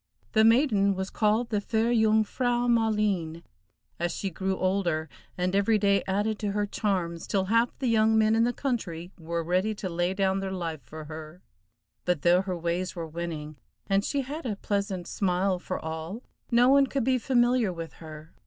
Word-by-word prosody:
The 220 - +4
maiden 220 -4 +4
was 190 0 -4
called 220 +2 +1
the 210 -2 +1
fair 225 +2 0
Jung 220 -2 +4
frau 245 +2 0
Maleen, 210 -8 +1 0.6
as 175 0 0
she 195 - -3
grew 190 +3 -2
older 180 -4 0 0.3
and 180 +1 0
every 200 +2 +3
day 200 -1 +2
added 205 +3 0
to 205 -2 -2
her 205 0 0
charms, 185 -5 -2
till 195 -2 0
half 230 +4 +1
the 265 - -4
young 220 -2 +3
men 220 0 +4
in 225 - +3
the 240 - +2
country 190 -11 -3
were 170 +1 -3
ready 185 +6 0
to 200 - -4
lay 175 +2 -1
down 195 0 +1
their 195 0 -3
life 165 -5 -4
for 155 0 -9
her; 155 +3 -9 0.6
but 180 -5 0
though 175 +1 +5
her 185 -2 -3
ways 170 +3 -2
were 170 -2 -4
winning, 155 -2 -6 0.3
and 195 0 +1
she 280 +4 -1
had 295 +5 -6
a 210 - -2
pleasant 200 -3 -2
smile 185 0 0
for 185 - -4
all, 160 +8 -6 0.3
no 240 +1 +5
one 275 +1 +5
could 270 -1 -1
be 255 +1 +2
familiar 240 -4 +2
with 165 -2 -7
her. 155 -1 -10
195 Hz, 190 wpm, -27 LUFS, 175-220 Hz, 0.6 s, though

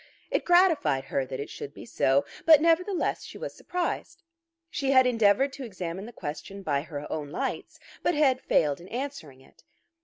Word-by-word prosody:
It - - 0
gratified 350 - +4
her 135 -1 -2
that 130 - -5
it 140 - -5
should 140 - -8
be - - -10
so, 135 +3 +2 0.2
but 315 -3 +8
nevertheless 345 +4 +1
she - - -10
was - - -6
surprised. 360 -1 -4 0.5
She 275 -2 -1
had 260 -1 +6
endeavoured 245 +3 +3
to 275 -1 -7
examine 190 -3 -5
the - - -9
question 195 +2 -7
by 145 -5 0
her 145 -1 -7
own 150 -2 -3
lights, 150 - -4 0.2
but - - +1
had 270 -4 +3
failed 150 0 +1
in 175 - -12
answering 235 - -6
it. - - -22
205 Hz, 180 wpm, -27 LUFS, -, 0.5 s, but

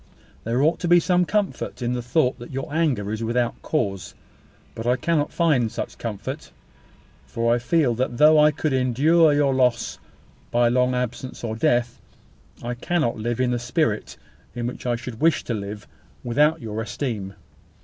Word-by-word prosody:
There 120 +4 +1
ought 165 +2 +2
to 175 - -2
be 175 +1 +6
some 180 +1 +2
comfort 205 +1 -2
in 120 +1 0
the 125 - -2
thought 125 +2 +1
that 120 - -9
your 135 +2 -5
anger 140 -11 0
is 110 +1 -3
without 120 +1 -1
cause: 100 - -2 0.6
but 115 +1 -5
I 125 - +4
cannot 150 +3 0
find 145 -10 +2
such - - -6
comfort; 115 +6 -6 0.8
for 115 0 +1
I 120 - +1
feel 140 0 +2
that 120 0 -2
though 155 +2 +6
I 150 0 +6
could 150 0 -2
endure 145 +6 +4
your 145 -2 +2
loss 125 -2 +1 0.5
by 120 0 +3
long 125 +1 +2
absence 125 +1 -4
or 110 -1 -3
death, 120 -2 0 0.6
I 120 +1 -3
cannot 150 0 -1
live 120 +2 -2
in 125 -1 +2
the 120 - 0
spirit 120 -2 -1 0.4
in 120 -1 -3
which 125 +1 -5
I 120 - +1
should 120 -1 -8
wish 165 +1 +3
to 120 - -3
live, 105 0 -6 0.4
without 150 +6 +2
your 110 0 -4
esteem. 110 -5 -4
125 Hz, 175 wpm, -23 LUFS, 115-150 Hz, 0.8 s, be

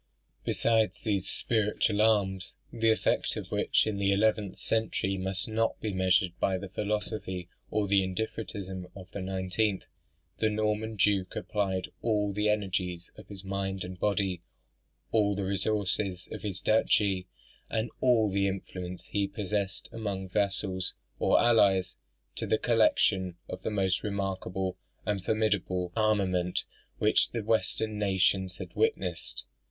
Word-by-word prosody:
Besides 110 -1 +1
these 100 -4 0
spiritual 105 -1 +1
arms 100 -4 +2 0.2
(the 115 -1 +2
effect 110 - +2
of - - -6
which - - +2
in 105 -2 -2
the 100 0 +2
eleventh 105 -1 +2
century 110 -3 0
must 95 0 +1
not 115 +1 0
be 105 -2 -3
measured 95 -1 +3
by 95 -1 +1
the 95 +1 -7
philosophy 105 -3 -3 0.2
or 105 -2 0
the 100 0 +4
indifferentism 95 -1 -4
of 95 -2 -11
the 100 - -5
nineteenth), 95 +2 -1 0.5
the 110 - +3
Norman 110 +1 -1
duke 100 -2 +2
applied 95 -3 -1
all 105 -3 +1
the 105 +1 +1
energies 95 -4 -1
of - - -13
his 100 -2 -9
mind 95 0 -2
and 90 0 -7
body, 100 -4 0 0.7
all 105 -2 +3
the 100 0 -2
resources 100 -1 0
of - - -6
his 100 -3 -3
duchy, 100 -4 +2 0.4
and 110 +1 -1
all 120 -4 +4
the 100 0 +1
influence 90 -2 -5
he 100 -1 0
possessed 100 -1 -2
among 100 -4 -4
vassals 95 -1 0 0.2
or - - +4
allies, 95 -6 +4 0.4
to - - -2
the 110 - +3
collection 95 -6 +3
of 95 - -6
"the - - -2
most 95 -3 +1
remarkable 95 -2 -2 0.3
and 100 -3 -1
formidable 95 -5 0
armament 95 -5 +1 0.3
which 105 0 +3
the 115 -2 -3
Western 110 -1 0
nations 95 -2 +2
had - - -8
witnessed." 450 0 -1
100 Hz, 140 wpm, -29 LUFS, 95-110 Hz, 0.7 s, the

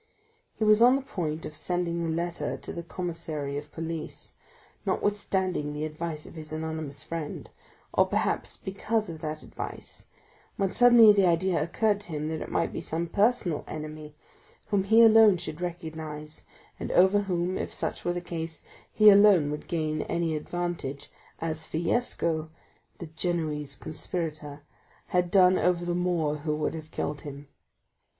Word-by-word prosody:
He - - -2
was 215 +1 +5
on 250 +2 +7
the 275 - -2
point 160 - -3
of 150 - -7
sending 175 0 -1
the 165 - -1
letter 170 +1 -2
to - - -8
the 170 - -5
commissary 165 -5 -4
of 145 +1 -6
police, 165 -1 -5 0.5
notwithstanding 190 -7 -1
the 150 +1 -3
advice 155 0 -4
of - - -11
his 155 -2 -8
anonymous 155 -2 -4
friend, 165 -3 -5 0.5
or - - +4
perhaps - - -1
because 215 +1 -2
of 160 - -8
that 155 0 -5
advice, - - -7 0.5
when 195 -1 0
suddenly 240 -3 +8
the 200 -2 +4
idea 175 -1 +2
occurred 205 +6 +1
to 205 - -10
him 150 +1 -2
that 160 -1 -3
it - - -5
might 165 - 0
be - - -4
some 165 +2 -2
personal 200 -3 +1
enemy, 155 -1 -7 0.5
whom 200 -2 +1
he 225 +3 +6
alone 220 -3 +7
should 160 0 -6
recognize 160 -3 -6 0.3
and - - -4
over 190 +3 +5
whom, 185 -2 -1
if - - -3
such - - -2
were 175 - 0
the 175 - -3
case, 165 -2 -5 0.3
he 215 -1 +8
alone 200 -7 +6
would 150 - -6
gain 155 -2 -1
any 170 -1 0
advantage, 165 -3 -4 0.3
as 160 -1 -2
Fiesco17 160 - -3 0.5
had 180 -1 +1
done 185 0 +5
over 175 -1 +1
the 175 - -1
Moor 175 -4 0
who 150 +1 -2
would 155 - -1
have 155 -1 -8
killed 145 -2 -3
him. 145 -1 -9
165 Hz, 155 wpm, -28 LUFS, 155-185 Hz, 0.5 s, suddenly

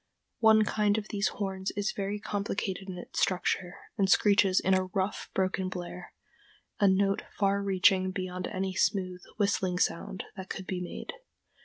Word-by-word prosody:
One 220 -1 +6
kind 210 0 +2
of 215 -1 -4
these 200 -1 +1
horns 190 -1 -3
is 205 +1 0
very 200 +1 -3
complicated 195 -2 -3
in 180 - -5
its 175 - -5
structure, 180 -1 0 0.2
and 195 -1 +3
screeches 200 -1 +5
in 190 - +2
a 185 0 +3
rough, 190 +1 -2
broken 190 0 0
blare, 180 -1 -7 0.7
a 200 - +5
note 195 +1 +3 0.2
far 200 0 +2
reaching 190 -1 +3
beyond 185 -1 -4
any 190 0 -2
smooth, 185 -2 0 0.2
whistling 195 -3 +1
sound 180 +1 -1
that 190 -2 -8
could 190 - -5
be 180 -1 -3
made. 180 - -6
190 Hz, 160 wpm, -29 LUFS, 185-200 Hz, 0.7 s, One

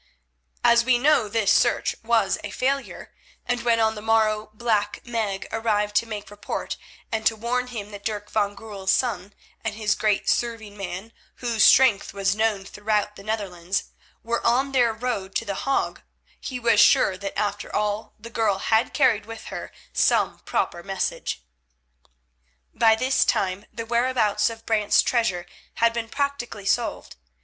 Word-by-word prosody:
As 235 0 +5
we 245 0 +3
know 265 -4 +3
this 215 -2 +2
search 240 - +2
was 220 -4 +2
a 205 - -4
failure, 270 +6 -2 0.3
and 245 -1 -1
when 235 -1 +2
on 220 0 +3
the 210 - -8
morrow 215 -1 +2
Black 215 -2 0
Meg 220 -5 -2
arrived 210 -2 0
to 230 - +1
make 210 -2 -6
report 205 0 -4 0.4
and 220 -1 -1
to 225 - +2
warn 245 +3 -1
him 215 -4 -7
that 205 -1 -9
Dirk 210 -2 -4
van 205 -2 0
Goorl's 200 -2 -7
son 205 -6 -1 0.3
and 220 -2 -2
his 210 -1 +1
great 210 -2 0
serving 225 -3 -1
man, 195 +2 -6 0.2
whose 235 -3 0
strength 235 -7 +5
was 195 0 +1
known 215 -3 0
throughout 210 0 -1
the - - -11
Netherlands, 195 -4 -3 0.3
were 235 +1 -2
on 260 +4 +2
their 245 -4 +3
road 220 -4 -4
to 230 - 0
The 200 - -2
Hague, 275 +7 -1 0.4
he 255 -2 -5
was 230 -3 +3
sure 205 -2 +5
that 195 +1 -6
after 205 -1 -2
all 210 +1 -2
the 230 +2 -10
girl 215 -4 +1
had 220 +3 +1
carried 225 -7 +3
with 225 -1 -8
her - - -6 0.2
some - - +2
paper 175 - -2
or - - -11
message. 190 - -3 1.3
By 225 -1 +5
this 255 +4 +2
time 190 +1 0
the 230 - -6
whereabouts 235 -3 +2
of 225 0 -10
Brant's 215 -2 +3
treasure 190 -8 0 0.3
had 230 0 +3
been 230 -1 -3
practically 280 -7 -3
solved. 235 - -1
220 Hz, 165 wpm, -24 LUFS, 205-235 Hz, 1.3 s, As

